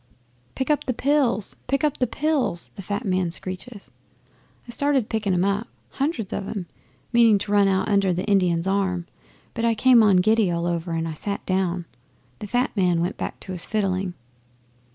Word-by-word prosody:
'"Pick 265 +3 -1
up 295 - 0
the 255 - -1
pills! 260 -7 +1
Pick 275 +2 0
up 300 -2 +1
the 250 - +1
pills!" 270 - -1
the - - -7
fat 205 +2 -4
man 185 -2 +1
screeches. 190 +5 -6 0.8
'I - - -7
started 275 -2 +1
picking 215 -3 -1
'em 180 0 +2
up 200 +4 0 0.2
hundreds 275 - -2
of 195 - -3
'em 195 -5 -4 0.5
meaning 230 -3 +6
to 205 +1 -5
run 205 -1 +5
out 190 -1 +1
under 200 -3 +2
the 180 +2 -2
Indian's 180 -4 +2
arm, 190 -3 0 0.5
but 230 - -3
I 230 -1 +3
came 245 +1 +6
on 205 -4 +5
giddy 215 +1 +3
all 170 0 -1
over 170 0 -2
and 165 0 -1
I 160 - -4
sat 200 +6 -4
down. 185 -2 0 0.5
The 210 - -6
fat 245 +5 0
man 180 -4 +2
went 175 +2 -1
back - - -5
to 190 - -6
his 180 -2 -3
fiddling. 190 -3 -1
200 Hz, 190 wpm, -24 LUFS, 185-230 Hz, 0.8 s, meaning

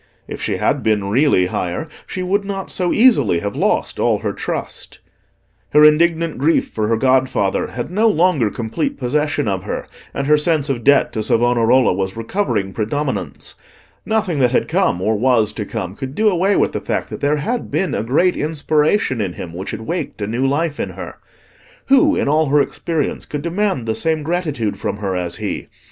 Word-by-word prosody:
If - - -7
she - - -1
had - - 0
been 105 -3 0
really 130 -6 +3
higher, 90 - -3 0.2
she 185 - -4
would 200 +3 0
not 195 -1 -5
so 180 -2 0
easily 215 - +4
have 100 0 -4
lost - - 0
all 115 -3 +2
her 100 - 0
trust. - - -5 0.8
Her 150 +1 +7
indignant 165 0 +3
grief 160 +4 +2
for 110 -1 -2
her 115 0 +1
godfather 130 -5 +1
had 120 +6 -5
no 215 +5 +3
longer 165 - +2
complete 115 +9 -3
possession 145 +1 0
of 95 -2 -1
her, - - -4 0.3
and 140 - -3
her 150 +1 +4
sense 150 -2 +1
of 120 -3 -3
debt 140 +2 +4
to 110 - -2
Savonarola 120 +2 +3
was 95 +2 -3
recovering 115 - -2
predominance. 130 +7 -3 0.5
Nothing 215 -8 0
that 125 -2 +4
had 125 - +1
come, 90 - +1
or 110 +2 +2
was 115 -1 +2
to 105 - -4
come, 95 -5 -4
could 135 +3 -6
do 220 0 +3
away 195 +1 +2
with - - +2
the - - -4
fact - - -3
that - - -6
there 145 +1 +2
had 230 +11 -3
been 180 -7 -1
a - - -1
great 150 +11 +2
inspiration 150 - +1
in 95 -4 -2
him 85 -1 -8
which 90 +3 -6
had - - -5
waked 170 +5 -4
a 105 - -2
new 120 +6 0
life 150 +2 -1
in - - -2
her. - - -9 0.7
Who, 295 +3 +5
in - - 0
all 155 +2 +2
her 145 +2 +3
experience, 155 +1 -2
could 145 -1 -5
demand 175 - -1
the 110 - 0
same 160 +3 -1
gratitude 150 - -2
from - - -3
her 100 -2 -3
as 90 -1 -3
he? - - -4
140 Hz, 195 wpm, -19 LUFS, 110-165 Hz, 0.8 s, Her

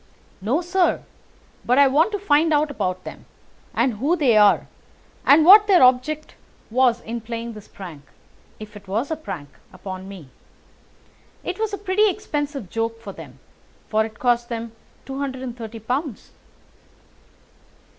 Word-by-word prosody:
"No, 245 - 0
sir. 355 +1 +1 0.6
But 250 +2 +2
I 280 - +7
want 310 +9 +3
to - - 0
find 320 -4 +2
out 300 0 +2
about 185 -7 -3
them, - - -10 0.5
and 235 -2 0
who 290 +10 +1
they 275 -9 +3
are, 210 -1 +5 0.6
and 300 +3 +7
what 410 +3 +9
their 370 -8 +6
object 260 +5 +2 0.4
was 245 -1 +3
in 235 0 -5
playing 230 +1 -6
this 210 -2 -12
prank—if 190 +5 -14
it 200 -1 -13
was 225 +10 -2
a - - 0
prank—upon 185 - -9
me. 180 -9 -11 1.1
It 365 +3 -5
was 440 -1 -1
a 405 - -3
pretty 410 +2 +2
expensive 295 - -4
joke 225 +3 -3
for 205 -4 -9
them, - - -12 0.5
for 220 0 +2
it 220 -1 -8
cost 240 -1 +1
them 230 -1 -5 0.3
two 270 +1 -5
and 260 -3 -4
thirty 225 -1 -8
pounds." 250 +3 -4
250 Hz, 145 wpm, -22 LUFS, 220-310 Hz, 1.1 s, what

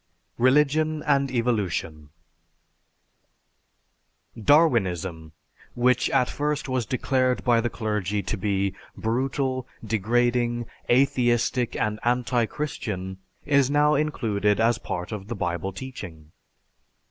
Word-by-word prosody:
RELIGION 150 +4 +3
AND 140 -2 +2
EVOLUTION 100 - -2 2.3
Darwinism, 95 - +2 0.4
which 125 0 +2
at 130 -2 +2
first 150 0 -2
was 130 -4 -1
declared 130 0 0
by 120 -2 +3
the 120 - -1
clergy 105 -3 -2
to 110 - -2
be 100 -1 -1 0.2
brutal, 130 +2 -1 0.2
degrading, 120 +2 +1 0.2
atheistic, 125 -2 +2
and 105 0 -1
anti 120 -1 +1
Christian, 95 -11 -5 0.3
is 140 -2 +3
now 150 +1 +3
included 110 -9 0
as 115 +1 +2
part 90 -1 -5
of 100 -2 -6
the 120 - -4
Bible 85 0 -2
teaching. 90 -9 -9
120 Hz, 100 wpm, -25 LUFS, 100-130 Hz, 2.3 s, RELIGION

